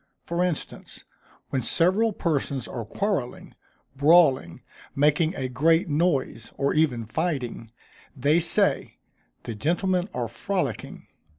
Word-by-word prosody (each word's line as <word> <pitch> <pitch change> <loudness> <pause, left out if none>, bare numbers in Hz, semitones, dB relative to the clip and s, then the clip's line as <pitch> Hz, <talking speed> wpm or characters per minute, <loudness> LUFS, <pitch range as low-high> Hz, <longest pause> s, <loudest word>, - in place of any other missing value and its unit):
For 170 +1 -1
instance, 180 -4 -5 0.5
when 130 - 0
several 185 - +2
persons 140 - -2
are 115 -3 -6
quarrelling, 160 - -3 0.4
brawling, 140 - +3 0.3
making 150 +4 +2
a 130 - -3
great 160 - +2
noise, 145 -7 -1
or 140 - +1
even 135 -8 +1
fighting, 125 -4 -3 0.5
they 145 +6 +3
say, 170 - +2 0.5
"_the 115 - -6
gentlemen 180 - 0
are 120 -7 -3
frolicking! 180 - -4
150 Hz, 110 wpm, -25 LUFS, 125-175 Hz, 0.5 s, brawling